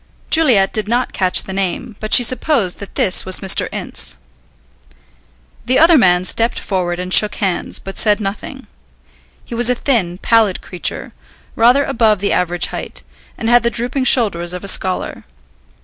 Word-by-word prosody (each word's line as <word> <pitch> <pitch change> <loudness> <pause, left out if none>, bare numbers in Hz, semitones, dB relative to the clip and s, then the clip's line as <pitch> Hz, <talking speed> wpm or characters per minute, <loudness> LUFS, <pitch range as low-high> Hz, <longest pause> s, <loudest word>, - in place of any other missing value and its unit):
Juliet 250 -12 +3
did 215 -2 -2
not 240 +3 -1
catch 185 -1 +2
the 190 - -8
name, 195 +4 -4
but 215 - -7
she 245 - +7
supposed 245 - 0
that 200 - -11
this 185 - +2
was 185 0 0
Mr. 190 -1 +2
Ince. - - -5 1.5
The 255 +2 +1
other 330 +2 +5
man 180 - +3
stepped 230 +4 -1
forward 180 -3 -3
and 180 0 -4
shook 210 - +4
hands, 190 -4 -3
but 195 - -8
said 210 -1 +2
nothing. 200 0 -7 0.8
He - - -10
was 240 +1 +1
a 250 - +1
thin, 210 -10 -1
pallid 220 -2 +1
creature, 180 - -5 0.4
rather 250 +5 +3
above 225 -5 +1
the 200 +1 -2
average 175 -1 0
height, - - -7 0.3
and 225 - -4
had 240 +1 +4
the 235 - 0
drooping 245 +3 -2
shoulders 180 -10 +2
of 180 - -7
a - - -7
scholar. 185 -1 0
210 Hz, 165 wpm, -16 LUFS, 185-240 Hz, 1.5 s, she